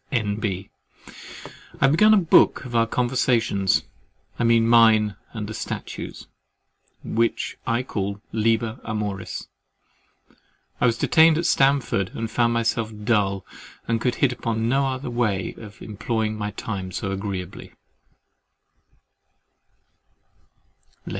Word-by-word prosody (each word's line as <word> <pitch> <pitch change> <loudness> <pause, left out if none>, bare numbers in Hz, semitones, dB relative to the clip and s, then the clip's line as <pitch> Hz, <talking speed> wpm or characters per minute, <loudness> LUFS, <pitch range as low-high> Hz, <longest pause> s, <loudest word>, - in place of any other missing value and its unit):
N.B.—I 105 -5 -6
have 135 - +4
begun 210 +8 +5
a 215 - +7
book 170 -6 +4
of 120 -2 -6
our 115 0 +3
conversations 120 -6 +1 0.6
(I - - +1
mean 115 -1 +4
mine 110 -3 +5 0.2
and 105 -2 -5
the 110 - -6
statue's) 110 - -6 0.8
which 115 +1 -1
I 120 +1 +1
call 100 -4 -4
LIBER 110 +1 0
AMORIS. 105 -3 -4 1.3
I - - +5
was 115 -1 +1
detained 160 +4 +5
at 170 - -1
Stamford 135 -8 +2
and 115 -1 -4
found 120 -1 +2
myself 115 -1 0
dull, 100 -4 +1 0.4
and 115 -1 0
could 125 -1 0
hit 135 +1 +2
upon 115 -2 -2
no 135 +3 +2
other 130 -1 -4
way 110 -6 -1
of 110 +1 -12
employing 110 0 -2
my 105 -1 -3
time 100 -3 -5
so 100 +2 -3
agreeably. 95 -2 -5
115 Hz, 115 wpm, -23 LUFS, 105-120 Hz, 1.3 s, a